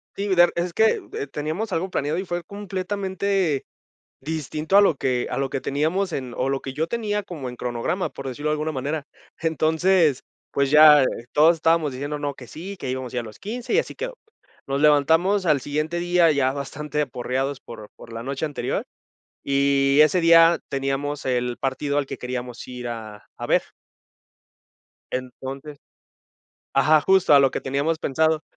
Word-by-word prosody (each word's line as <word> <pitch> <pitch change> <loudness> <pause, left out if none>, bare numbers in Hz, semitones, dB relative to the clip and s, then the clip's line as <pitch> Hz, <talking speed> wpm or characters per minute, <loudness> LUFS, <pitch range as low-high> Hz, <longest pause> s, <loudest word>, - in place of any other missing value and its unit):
Sí, 200 -1 -1
der 175 0 +6
es 170 0 -2
que, 220 0 +3
eh, 140 - -4
teníamos 155 +10 -4
algo 185 +3 -1
planeado, 150 0 -1
y 190 - -3
fue 175 -1 -3
completamente 195 -4 -2 0.5
distinto 155 +4 -1
a - - +8
lo 180 -7 +4
que 125 -2 -1
a - - -3
lo 135 -1 -1
que 135 - -3
teníamos, 165 +7 0
en 130 -4 -4
o, 130 +1 -1
lo 135 0 -1
que 135 - -6
yo 160 +3 -1
tenía 210 -2 -2
como 150 -9 -6
en 125 - -8
cronograma, 120 +10 -2
por 135 -1 -8
decirlo 145 +4 -3
de - - +2
alguna 155 +1 -2
manera. 145 +2 -3 0.3
Entonces, 160 -1 +2 0.3
pues, 140 0 0
ya 150 -2 +8 0.3
todos 160 +3 +5
estábamos 160 -2 +2
diciendo: 145 +3 -4
"No, 145 -1 -2
que 125 -3 -12
sí, 190 +4 -8
que 135 - -5
íbamos 130 -1 -4
a - - -3
ir 120 - -1
los 110 -1 -11
15, 240 +4 -5
y 460 - +5
así - - -4
quedó". - - -5 0.5
Nos 140 +1 -2
levantamos 160 +7 +4
al 150 -4 +3
siguiente 155 +5 -2
día, 175 -2 +3
ya 135 -2 +2
bastante 150 +2 -4
aporreados 130 +1 -2
por 110 -3 -11
por 115 - -13
la 115 +1 -6
noche 140 +3 -3
anterior, 145 - -3 0.6
y 140 0 +2
ese 155 +4 +4
día 165 0 +6
teníamos 135 +1 -2
el 125 -1 -1
partido 140 +2 -1
al 145 - +1
que - - -7
queríamos 125 -1 -6
ir 125 -1 -6
a 110 -3 -8
a - - -5
ver. - - +3 1.5
Entonces 135 +3 -6 1.0
ajá, 150 +3 +5
justo 190 -5 +4
a - - +9
lo 135 - +4
que - - -3
teníamos 140 +4 -1
pensado. 160 +2 +1
150 Hz, 180 wpm, -23 LUFS, 135-170 Hz, 1.5 s, a